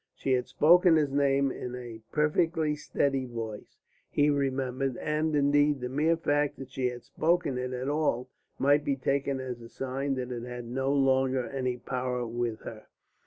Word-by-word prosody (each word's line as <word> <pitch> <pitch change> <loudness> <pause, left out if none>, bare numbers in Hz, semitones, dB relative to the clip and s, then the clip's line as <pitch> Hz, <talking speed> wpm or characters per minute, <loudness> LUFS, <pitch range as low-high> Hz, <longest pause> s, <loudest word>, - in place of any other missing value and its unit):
She 135 - -2
had 125 -1 0
spoken 175 +2 +5
his 150 -3 +2
name 140 -1 +2
in 125 -1 -6
a 120 -3 -8
perfectly 155 0 +1
steady 140 -3 -1
voice, 115 -3 -7 0.3
he 145 0 +3
remembered; 135 -2 -1
and, 155 0 0
indeed, 145 0 +3
the 125 0 -4
mere 155 +5 +2
fact 145 -2 0
that 135 -1 -9
she 130 -1 -1
had 120 -1 -8
spoken 160 +2 0
it 125 0 -3
at 130 +1 -3
all 145 -4 0 0.3
might 145 +2 +3
be 140 -2 0
taken 135 0 -1
as 125 -2 -5
a 115 - -11
sign 135 +2 -2
that 125 -1 -4
it 120 -1 -4
had 125 0 -6
no 135 +3 -1
longer 130 -2 +2
any 130 -2 -2
power 125 -1 -2
with 115 -1 -3
her. 110 -1 -9
135 Hz, 175 wpm, -29 LUFS, 125-145 Hz, 0.3 s, spoken